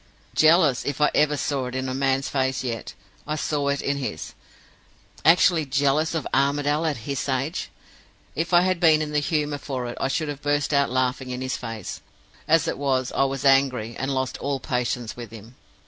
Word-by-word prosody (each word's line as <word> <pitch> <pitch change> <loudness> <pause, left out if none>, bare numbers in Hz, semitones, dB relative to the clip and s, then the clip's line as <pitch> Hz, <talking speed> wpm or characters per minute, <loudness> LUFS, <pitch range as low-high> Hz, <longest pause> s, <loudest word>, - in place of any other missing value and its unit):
Jealous 155 -5 +4
if 145 0 -3
ever 150 0 +3
I - - 0
saw 140 -2 -2
it 125 - -6
in 130 0 -2
a 130 - -2
man's 135 0 0
face 130 -2 -1
yet, 115 -3 -5 0.3
I 155 - -1
saw 145 0 -1
it 140 0 0
in 140 0 0
his 125 - -5 0.9
actually 170 0 +5
jealous 140 +4 +1
of 160 - -2
Armadale 145 +3 +1
at 150 - -1
his 140 0 -3
age! 135 +5 -2 0.7
If 165 +1 -2
I 175 0 +6
had 185 -1 +1
been 155 -2 +5
in 150 - -5
the 150 - +2
humor 150 -1 -1
for 130 -3 -4
it, 120 - -6
I - - +1
should 155 +3 -1
have 145 -1 -6
burst 145 0 0
out 140 0 +3
laughing 130 +1 -1
in 125 0 -4
his 130 0 -2
face. 115 -5 -6 0.5
As 165 +1 +3
it - - -2
was, 130 -3 0
I 135 - +2
was 135 0 -3
angry, 130 -4 +3
and 135 - -3
lost 130 -1 -2
all 140 -1 -2
patience 125 -2 -2
with 120 -2 -8
him. 115 +1 -12
140 Hz, 200 wpm, -24 LUFS, 130-150 Hz, 0.9 s, I